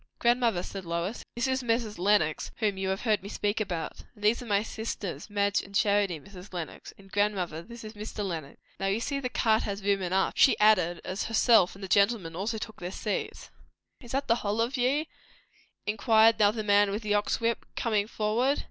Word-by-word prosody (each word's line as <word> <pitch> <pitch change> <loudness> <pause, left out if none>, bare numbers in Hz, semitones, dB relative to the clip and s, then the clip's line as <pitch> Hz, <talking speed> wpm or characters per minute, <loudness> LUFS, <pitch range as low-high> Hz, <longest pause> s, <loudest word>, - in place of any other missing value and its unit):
"Grandmother," 235 -6 +2
said 195 0 -7
Lois, 170 +6 -3
"this 240 +2 0
is 260 0 0
Mrs. 230 -4 -1
Lenox, 180 -5 +2
whom 210 -3 0
you 190 0 -2
have 190 0 -1
heard 215 -4 +1
me 200 - -8
speak 205 +1 -1
about. 175 -6 -4
And 210 - -15
these 215 +4 +3
are 245 - -8
my 205 -1 +2
sisters, 220 -4 -5
Madge 200 -1 +1
and 200 0 -12
Charity, 200 -4 +2
Mrs. 190 +2 -13
Lenox. 175 -4 -6
And 195 -1 -17
grandmother, 190 -6 0
this 235 +6 -11
is 215 0 -8
Mr. 210 -1 -5
Lenox. 160 -6 -5 0.2
Now, 195 - -1
you 195 +3 +1
see 275 +4 -2
the 255 -2 -3
cart 220 -3 +2
has 200 0 -4
room 200 -1 +2
enough," 190 +1 +1
she 265 - +5
added, 180 -5 +3
as 185 +2 -3
herself 225 -4 +4
and 200 - -11
the - - -4
gentleman 200 -3 +2
also 210 +5 -2
took 220 0 -7
their 180 +1 -5
seats. 210 +1 -4 0.5
"Is 240 -2 -10
that 275 +1 -1
the 230 - +3
hull 210 +1 -1
of 235 +4 0
ye?" 275 +5 +1 0.8
inquired 220 +1 +4
now 205 -1 +6
the 215 +1 -3
man 205 0 +4
with 210 +3 -3
the 210 -1 0
ox 205 0 +1
whip, 230 0 0
coming 215 -3 0
forward. 230 +6 +1
210 Hz, 210 wpm, -28 LUFS, 195-230 Hz, 0.8 s, now